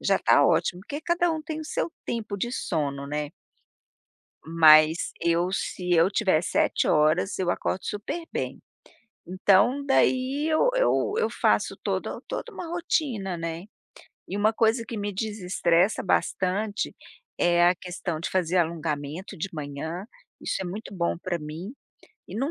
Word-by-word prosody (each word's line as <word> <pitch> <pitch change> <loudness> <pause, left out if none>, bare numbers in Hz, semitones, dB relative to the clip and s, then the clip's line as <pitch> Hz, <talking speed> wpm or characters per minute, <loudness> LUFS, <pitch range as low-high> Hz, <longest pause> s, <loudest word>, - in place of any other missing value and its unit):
já - - +2
tá - - +4
ótimo 180 - +2
porque 290 +8 -6
cada 345 +1 +1
um 315 -1 -4
tem 315 0 -5
o 310 - -6
seu 310 - -2 0.2
tempo 215 -3 -3
de 240 +5 -2
sono, 140 - -2
né 150 0 -3 1.2
Mas 160 0 +6
eu, 170 +1 +2
se 180 -2 -3
eu 170 +2 +5
tiver 190 -6 +2
7 - - +1
horas 155 +6 +2
eu 185 -2 0
acordo 185 - -2
super 210 +11 -4
bem. - - -4 0.7
Então 200 +9 +3
daí 270 +1 +2
eu 320 +10 +3
eu - - +2
eu 465 - +1
faço - - +1
todo - - -2
toda 480 - -5
uma 355 -3 -6
rotina, 280 - -1
né, 165 +1 -5 0.6
e 195 - -4
uma 210 +2 +3
coisa 225 +1 +2
que 230 - -6
me 205 0 -3
desestressa 190 -2 +1
bastante 200 +2 0 0.4
é 175 0 +4
a 180 - +3
questão 175 -2 -5
de - - -3
fazer 185 -1 +1
alongamento 160 0 -2
de 170 - -3
manhã, 160 +5 -5 0.3
isso - - -2
é - - -3
muito 200 +3 -6
bom 170 -2 0
para 175 -1 -3
mim, 160 +8 -7 0.5
e - - -10
não 270 +7 -1
185 Hz, 155 wpm, -26 LUFS, 165-230 Hz, 1.2 s, Mas